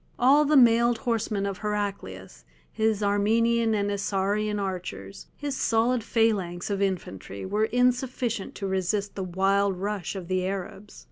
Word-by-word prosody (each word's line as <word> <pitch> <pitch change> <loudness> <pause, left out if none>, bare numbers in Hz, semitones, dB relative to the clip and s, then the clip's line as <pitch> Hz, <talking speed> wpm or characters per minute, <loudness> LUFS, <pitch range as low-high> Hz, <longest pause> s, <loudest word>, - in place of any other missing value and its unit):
All 280 +5 +5
the 295 0 +4
mailed 235 -1 +5
horsemen 220 -3 -1
of 200 -2 -4
Heraclius, 200 - -4 0.3
his 220 -1 0
Armenian 225 +3 +2
and 205 -1 0
Isaurian 205 +1 -1
archers, 175 - -6
his 285 -2 -3
solid 230 0 +1
phalanx 205 -6 0
of 200 0 -1
infantry, 130 - -3
were 210 +3 +1
insufficient 245 -2 0
to 200 - -5
resist 190 +2 -1
the 195 - -5
wild 195 +1 +1
rush 200 0 -3
of 185 -3 -6
the 185 0 0
Arabs. 195 +1 -6
205 Hz, 140 wpm, -26 LUFS, 190-230 Hz, 0.3 s, All